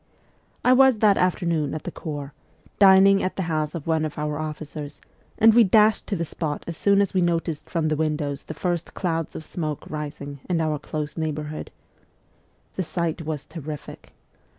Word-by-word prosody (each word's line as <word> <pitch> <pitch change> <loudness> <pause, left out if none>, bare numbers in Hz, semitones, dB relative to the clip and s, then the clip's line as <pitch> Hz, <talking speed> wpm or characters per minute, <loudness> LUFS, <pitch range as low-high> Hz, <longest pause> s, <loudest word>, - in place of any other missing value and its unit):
I 250 - +7
was 265 -2 +6
that 210 -2 +5
afternoon 170 -5 0
at 155 - -5
the - - -5
Corps, 145 -3 -6 0.5
dining 195 0 +7
at 185 - -2
the 190 - -2
house 155 -1 -2
of 160 - -5
one 160 -1 +1
of 155 -1 -4
our 150 0 -2
officers, 150 -1 -6 0.4
and 225 0 +7
we 235 +1 +7
dashed 215 +2 +4
to 205 - -1
the 170 -2 -2
spot 150 -2 -4
as 170 - -5
soon 200 +4 +3
as 200 - 0
we 185 - +2
noticed 165 -3 -1
from 165 -2 0
the 155 - +1
windows 150 -2 -2
the 160 - -7
first 175 -2 -2
clouds 165 -4 -2
of 160 - -7
smoke 155 -4 -4
rising 145 -2 -6
in 175 -2 +1
our 155 -2 0
close 150 +1 -5
neighbourhood. 155 -1 -4 1.0
The - - -2
sight 170 -1 -2
was 150 -3 -3
terrific.' 155 -3 -8
160 Hz, 180 wpm, -24 LUFS, 150-185 Hz, 1.0 s, I